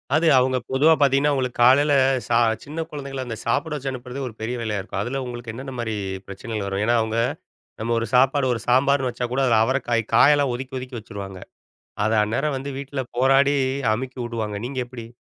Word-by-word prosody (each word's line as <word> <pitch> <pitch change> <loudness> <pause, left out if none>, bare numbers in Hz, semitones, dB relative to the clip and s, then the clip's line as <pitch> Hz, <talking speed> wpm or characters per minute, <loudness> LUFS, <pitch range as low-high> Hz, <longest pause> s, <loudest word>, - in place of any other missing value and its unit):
அது 165 +1 +3
அவுங்க 130 0 +3
பொதுவா 150 +5 +5
பார்த்தீங்கன்னா, 140 +1 +4
அவுங்களுக்கு 130 -3 -2
காலையில 145 +4 +5 0.3
ச - - -21 0.3
சின்ன 155 +3 -4
குழந்தைகள 140 -2 -5
அந்த 120 -2 -5
சாப்பாடு 145 +6 0
வச்சு 140 -2 -4
அனுப்புறது 125 +1 -7
ஒரு 120 - -8
பெரிய 115 +3 -3
வேலையா 105 -3 -2
இருக்கும். 95 -1 -4
அதில 130 +6 -3
உங்களுக்கு 120 -1 -6
என்னென்னமாரி 120 -3 -5 0.3
பிரச்சனைகள் 105 +1 -5
வரும்? 100 +1 -2
ஏன்னா, 120 +1 +3
அவுங்க 110 +1 -1 0.6
நம்ம 115 +1 -1
ஒரு 115 - -2
சாப்பாடு 135 +2 +4
ஒரு 115 - -4
சாம்பார்ன்னு 130 +1 +3
வச்சா 125 +1 -3
கூட 135 - +1
அதில 115 -3 +4
அவரைக்காய் 120 -3 0
காயெல்லாம் 145 +1 +5
ஒதுக்கி 130 +1 -7
ஒதுக்கி 125 -1 -7
வச்சுருவாங்க. 100 -3 -8 0.7
அத 110 - +1
அந்நேரம் 135 +6 -1
வந்து 135 +2 -5
வீட்ல 140 0 -4 0.2
போராடி 135 +3 +4 0.4
அமுக்கி 130 +2 -6
விடுவாங்க. 110 -3 -4
நீங்க 130 +1 -5
எப்பிடி? 120 -2 -9
125 Hz, 180 wpm, -23 LUFS, 115-135 Hz, 0.7 s, பொதுவா